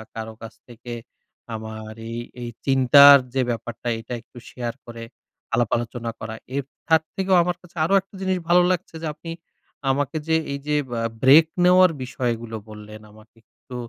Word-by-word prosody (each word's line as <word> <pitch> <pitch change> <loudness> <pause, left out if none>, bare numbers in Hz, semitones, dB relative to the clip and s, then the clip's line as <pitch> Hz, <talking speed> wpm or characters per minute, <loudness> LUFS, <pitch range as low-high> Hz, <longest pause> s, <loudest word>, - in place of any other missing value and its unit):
কারো 110 0 -6
কাছ 115 0 -9
থেকে, 120 0 -9 0.6
আমার 110 0 -7 0.2
এই 115 - -4 0.2
এই 120 - -5 0.2
চিন্তার 140 +1 +8 0.2
যে 135 - +1
ব্যাপারটা, 120 0 -5
এটা 115 +2 -8
একটু 120 - -20
শেয়ার 120 -2 -5
করে, 115 -1 -9 0.5
আলাপ-আলোচনা 120 0 -1
করা। 110 0 -6 0.2
এর 140 - -1 0.2
তার 160 -1 +5
থেকেও 190 -1 +2
আমার 175 0 -1
কাছে 180 -1 -19
আরো 195 - 0
একটা 195 +1 -19
জিনিস 190 -1 0
ভালো 175 +1 +6
লাগছে, 175 -2 -3
যে 165 - -3
আপনি 165 +2 -9 0.6
আমাকে 145 +3 -1
যে 160 - +3 0.2
এই 140 - -4
যে, 150 - +1 0.2
আ - - -2 0.2
ব্রেক 145 +5 +8 0.2
নেওয়ার 180 0 +6
বিষয়গুলো 120 -3 -3
বললেন, 105 0 -11
আমাকে 110 +2 -19
একটু 125 - -14
125 Hz, 165 wpm, -23 LUFS, 115-160 Hz, 0.6 s, চিন্তার